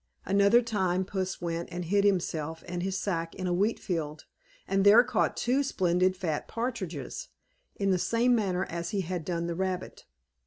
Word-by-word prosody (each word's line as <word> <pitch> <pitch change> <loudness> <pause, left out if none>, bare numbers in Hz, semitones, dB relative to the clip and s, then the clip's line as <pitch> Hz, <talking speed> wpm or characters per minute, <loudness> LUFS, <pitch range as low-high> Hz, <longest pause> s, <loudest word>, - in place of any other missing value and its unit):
Another 200 +5 +4
time, 190 -5 0
Puss 190 -1 -3
went 170 0 -3
and 175 0 -4
hid 200 +4 +2
himself 165 -5 0
and 175 0 -3
his 190 +1 -1
sack 165 -5 -2
in 185 - -4
a 180 - +1
wheat 205 +6 +1
field, 160 -4 -4 0.4
and 195 0 +2
there 210 +4 +8
caught 215 - 0
two 255 +3 +2
splendid 185 -7 +1
fat 160 -6 -2
partridges 190 - -4 0.5
in 195 -1 +1
the 185 - +2
same 235 +6 +2
manner 190 -5 +1
as 170 0 -4
he 205 -3 -1
had 180 -1 -3
done 170 0 -2
the 170 - -2
rabbit. 185 +1 -3
185 Hz, 180 wpm, -29 LUFS, 170-200 Hz, 0.5 s, there